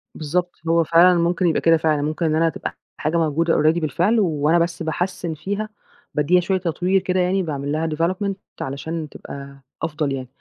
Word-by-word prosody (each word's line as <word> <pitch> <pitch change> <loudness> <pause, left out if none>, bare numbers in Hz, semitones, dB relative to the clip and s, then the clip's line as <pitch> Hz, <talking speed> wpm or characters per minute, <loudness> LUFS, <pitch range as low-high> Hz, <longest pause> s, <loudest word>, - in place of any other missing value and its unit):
بالضبط، 175 +4 -1 0.2
هو 165 0 +4
فعلًا 170 +2 +5
ممكن 175 +1 +1
يبقى 160 - +1
كده 165 0 +5
فعلًا 155 -2 +1
ممكن 155 +3 -1
إن 155 -1 +2
أنا 165 +1 +3
تبقى - - -6 0.2
حاجة 160 +2 0
موجودة 165 +1 +1
already 155 +3 +3
بالفعل 175 - +1
وأنا 160 -3 +2
بس 170 0 -1
باحسّن 170 +1 -2
فيها، 200 +7 -4 0.4
بادّيها 150 +5 +3
شوية 190 +2 0
تطوير 180 +2 0
كده 185 0 0
يعني 185 +1 +1
باعمل 145 -3 -3
لها 160 +2 0
development 180 +6 -1 0.3
علشان 155 +4 -4
تبقى 140 -1 -10 0.2
أفضل 150 -3 -1
يعني، 130 -1 -5
165 Hz, 180 wpm, -22 LUFS, 155-180 Hz, 0.4 s, فعلًا